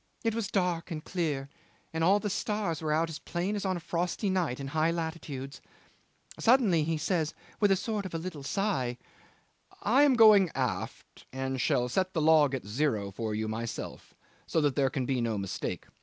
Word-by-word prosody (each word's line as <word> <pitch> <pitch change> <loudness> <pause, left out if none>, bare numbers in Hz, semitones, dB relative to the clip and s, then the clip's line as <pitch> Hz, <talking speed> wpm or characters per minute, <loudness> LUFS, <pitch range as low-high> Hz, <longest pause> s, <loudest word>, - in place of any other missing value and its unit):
It 225 -1 +1
was 225 -2 -2
dark 180 -4 0
and 155 -3 -5
clear, 150 -7 -2 0.5
and 160 0 -1
all 195 +4 +5
the 210 - -3
stars 205 -6 -2
were 155 -1 -1
out 160 +2 +2
as 155 - -6
plain 180 +4 -2
as 205 - -3
on 185 -1 0
a - - -5
frosty 175 +4 -1
night 170 -9 0
in 135 0 -5
high 155 +2 +2
latitudes. 160 -5 -4 0.8
Suddenly 225 - +4
he 160 +1 0
says 160 0 -1 0.2
with 205 - +4
a 195 - +5
sort 205 0 -2
of 170 - -8
a - - +1
little 165 -3 -6
sigh: 135 -7 -1 0.9
'I 250 +7 +4
am 290 -2 +6
going 215 -5 +7
aft, 130 -2 -4
and 130 0 -2
shall 125 0 +2
set 185 +9 0
the 165 - 0
log 150 -3 +5
at 130 - -6
zero 105 -3 -1
for 110 +2 -3
you 110 0 -2
myself, 115 +1 -5 0.3
so - - +1
that 145 -3 +1
there 135 -2 +3
can 130 -1 -2
be 130 -1 0
no 115 -2 0
mistake. 95 -1 -4
160 Hz, 195 wpm, -29 LUFS, 135-190 Hz, 0.9 s, going